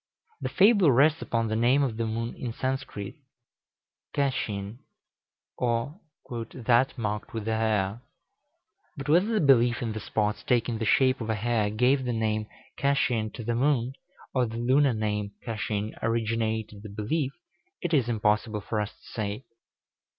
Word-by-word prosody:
The - - -2
fable 200 -5 +5
rests 145 +5 +4
upon 115 -1 0
the 110 - -1
name 125 +5 +4
of 120 -5 -1
the 115 -1 -1
moon 115 +1 -3
in 120 -3 -5
Sanskrit, 130 -3 -4 1.0
çaçin, 110 -6 -1 0.8
or 120 +7 -1 0.6
"that 125 +2 +2
marked 105 -1 -3
with 110 -2 -3
the 110 0 0
hare;" 110 -1 0 1.0
but 140 0 -6
whether 175 +7 +4
the 225 -1 +1
belief 120 -3 +4
in 115 - -2
the 110 - -4
spots 105 0 -1
taking 120 -3 +1
the 110 - -1
shape 130 +3 +3
of 115 - -4
a 110 - +1
hare 110 -1 +1
gave 125 +5 +2
the 125 -1 -1
name 110 -1 0 0.3
çaçin 125 -6 +1
to 120 - -6
the 120 +2 -1
moon, 130 0 +1 0.4
or 125 -2 +2
the 115 +1 -6
lunar 130 +2 +3
name 105 -1 -2
çaçin 110 -2 -2
originated 110 -2 -1
the 105 - -9
belief, 125 +8 -1 0.5
it 175 -2 -3
is 130 -6 +3
impossible 105 -1 +1
for 105 +1 -2
us 105 - -2
to - - -24
say. 105 +2 -3
115 Hz, 160 wpm, -27 LUFS, 110-130 Hz, 1.0 s, fable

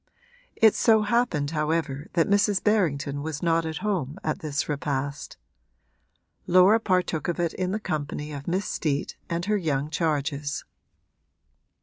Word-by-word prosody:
It 220 -2 +6
so 220 -2 +4
happened 210 -10 +1
however 150 -2 -1
that 165 -2 +2
Mrs. 200 -1 +2
Berrington 150 -9 +1
was 155 +1 -5
not 165 -1 +2
at 160 - -4
home 175 -7 -1
at 155 - -1
this 150 -2 -2
repast; 140 -1 -3 1.1
Laura 185 +5 +6
partook 180 -7 0
of 175 0 -2
it 170 -2 0
in 185 -1 -2
the 205 +3 -1
company 150 -4 -4
of 140 -1 -7
Miss 185 +4 0
Steet 145 -3 -2
and 170 +1 -2
her 210 +1 +2
young 150 -5 -1
charges. 150 -3 -1
160 Hz, 140 wpm, -26 LUFS, 145-185 Hz, 1.1 s, It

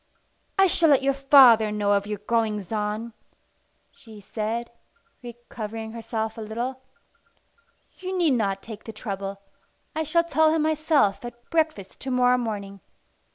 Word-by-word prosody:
"I 390 - +6
shall 335 -3 +3
let 275 -2 +4
your 275 0 +2
father 265 -6 +6
know 205 -1 0
of 200 0 +1
your 210 0 -3
goings 210 -2 -1
on," 215 +2 -3 0.8
she 220 -4 -14
said, 225 +4 -4 0.5
recovering 225 -2 -7
herself 225 -1 -4
a - - -5
little. 240 +4 -4 1.2
"You 375 0 -4
need 340 -4 +3
not 200 -5 -1
take 220 -2 -10
the 225 - -7
trouble. 200 -2 -6 0.5
I 315 - 0
shall 320 +2 +2
tell 315 -2 +3
him 315 - +1
myself 310 -9 +1
at 240 0 -10
breakfast 315 - -1
to 265 - -5
morrow 250 0 +3
morning. 200 -4 -5
230 Hz, 145 wpm, -25 LUFS, 210-275 Hz, 1.2 s, I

